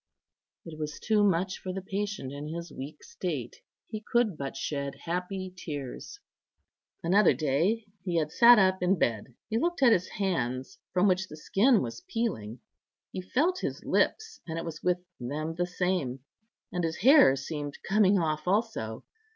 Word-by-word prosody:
It 160 -2 -9
was 150 -1 -4
too 215 -1 +2
much 185 -1 +1
for 185 - -5
the 190 +1 -4
patient 195 -7 -3
in 145 +1 -6
his 170 +1 -6
weak 145 +3 -8
state; 170 -7 -4 0.3
he 215 -1 -5
could 235 -6 +3
but 140 -2 -5
shed 140 0 -3
happy 180 +2 -3
tears. 150 - -7 0.8
Another 195 +5 +5
day 165 +10 +1 0.2
he 180 -2 -2
had 155 -2 0
sat 240 +6 +8
up 190 -2 +3
in 180 +2 +3
bed. 115 -2 -1
He 225 - 0
looked 345 -1 0
at 245 - +7
his 180 -2 +1
hands, 130 - -2
from 185 +2 +3
which 185 0 +2
the 155 - -10
skin 215 - +3
was 115 -1 -6
peeling; 120 - -3 0.5
he 185 - -4
felt 310 - +1
his - - -4
lips, 445 +1 0
and 165 0 -4
it 165 - -3
was 160 -2 -6
with 180 0 +2 0.2
them 150 +6 -3
the 175 +1 -1
same; 180 -8 -1 0.5
and 180 -1 -2
his 165 +1 -2
hair 260 - +7
seemed 145 +1 -5
coming 200 0 +4
off 155 -2 -1
also. 190 - -1
180 Hz, 165 wpm, -29 LUFS, 150-200 Hz, 0.8 s, sat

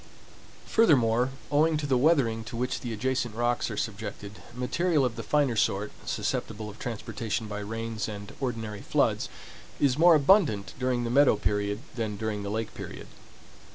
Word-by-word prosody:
Furthermore, 125 - +4 0.2
owing 155 +2 +3
to 150 - -3
the 135 -2 +2
weathering 125 -5 +3
to 115 - -6
which 125 +2 -1
the 120 - -5
adjacent 120 0 -1
rocks 120 +1 0
are 110 - -5
subjected, 105 -2 -5
material 150 +4 +1
of 120 -2 -2
the 115 - -4
finer 135 +2 +1
sort, 105 -1 +1 0.2
susceptible 105 -1 -3
of 105 - -16
transportation 115 -1 -3
by 105 -1 -5
rains 115 +1 -4
and 105 -1 -7
ordinary 115 -5 -3
floods, - - +1 0.5
is 140 -1 +2
more 170 0 +8
abundant 145 - +3
during 125 -1 0
the 115 - -2
meadow 140 -1 +5
period 105 0 -1
than 110 -4 -3
during 110 -1 -2
the 100 - -4
lake 110 +1 -3
period. - - -8
115 Hz, 160 wpm, -28 LUFS, 105-130 Hz, 0.5 s, more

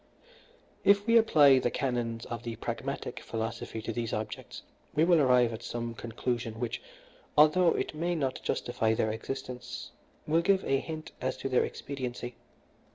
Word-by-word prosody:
"If 200 0 +5
we 230 0 +4
apply 150 - +7
the 120 - +1
canons 120 -3 -2
of 120 -1 -5
the 115 -1 -5
Pragmatic - - -4
philosophy 115 0 -4
to 115 - -3
these 115 0 -3
objects 110 0 -5 0.3
we 155 - +4
will 170 -1 +5
arrive 125 -3 +4
at 110 - -6
some 120 0 -4
conclusion 115 0 -3
which, 120 -1 -3 0.6
although 160 +4 +6
it - - -2
may 170 +3 -1
not 135 -5 -1
justify 115 -2 0
their 110 0 +1
existence, 125 +2 -6 0.3
will 160 +2 +3
give 195 +2 +2
a 135 - +2
hint 155 +1 -6
as 130 - -1
to 135 - -3
their 125 - +3
expediency. 125 -3 -5
125 Hz, 160 wpm, -30 LUFS, 115-150 Hz, 0.6 s, apply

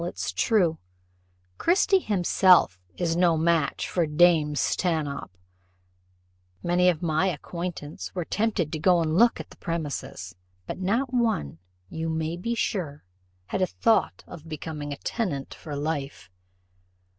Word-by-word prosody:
It's 175 - -3
true, 180 -8 +2 0.8
Christie 380 +2 +4
himself 185 - +4 0.2
is 165 -2 0
no 170 -2 +3
match 160 -2 +1
for 170 -3 0
dame 150 -1 +4
Stanhope. 145 - -1 1.3
Many 180 +1 +3
of 175 -1 -1
my 160 +3 +2
acquaintance 170 -2 -5
were 175 -3 -2
tempted 205 -7 0
to 155 - -2
go 180 +2 +4
and 160 -1 0
look 235 +5 +4
at - - -8
the - - -15
premises, 140 - -4 0.3
but - - -6
not 235 +8 0
one, 220 - 0 0.3
you 160 +8 -4
may 160 +1 -2
be 230 +7 -3
sure, 160 -10 -2 0.4
had 190 - -3
a 185 - +3
thought 225 +3 +1
of 160 0 -11
becoming 150 -1 -5
a 140 - -4
tenant 155 - -3
for 150 -2 -8
life." 145 - -4
165 Hz, 135 wpm, -26 LUFS, 150-185 Hz, 1.3 s, Christie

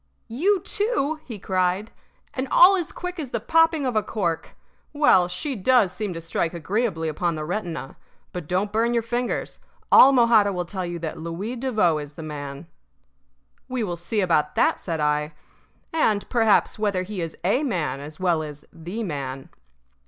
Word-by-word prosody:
"You 375 - +2
too!" 405 - -1
he 230 -5 -7
cried. 185 +2 -1 0.4
"And 260 +1 -3
all 370 +3 +7
as 350 -4 -2
quick 360 0 -6
as 285 -5 -4
the 235 - -2
popping 325 +4 +3
of 250 -3 -1
a 215 - +3
cork. 175 -7 -3 0.4
Well, 290 -12 +5
she 265 - -4
does 225 -2 +3
seem 205 +1 -3
to - - -4
strike 165 +1 -2
agreeably 175 0 -1
upon 170 +2 -1
the 155 0 -4
retina. 175 -6 -4 0.4
But 175 -4 -6
don't 190 +4 0
burn 230 +2 +1
your 230 - +1
fingers. 240 +2 -3 0.3
All 270 - +9
Mojada 235 -5 +5
will 180 -1 -2
tell 185 0 -4
you 175 0 -4
that 160 -2 -5
Louis 170 +9 -4
Devoe 215 -11 +1
is 145 0 -8
the 160 - -9
man. 145 -1 -7 1.0
"We 255 -3 -2
will 175 -4 -2
see 190 +6 -2
about 170 -5 +1
that," - - +2
said 165 -3 -3
I. 150 +1 0 0.6
"And, 215 -10 +1
perhaps, 225 -3 +3
whether 200 -4 0
he 195 -1 -5
is 165 -1 -5
a 205 +10 +2
man 180 - -1
as 150 +4 -9
well 175 -4 +1
as 150 -1 -8
the 180 +8 -5
man." 135 -6 -5
190 Hz, 175 wpm, -24 LUFS, 165-240 Hz, 1.0 s, All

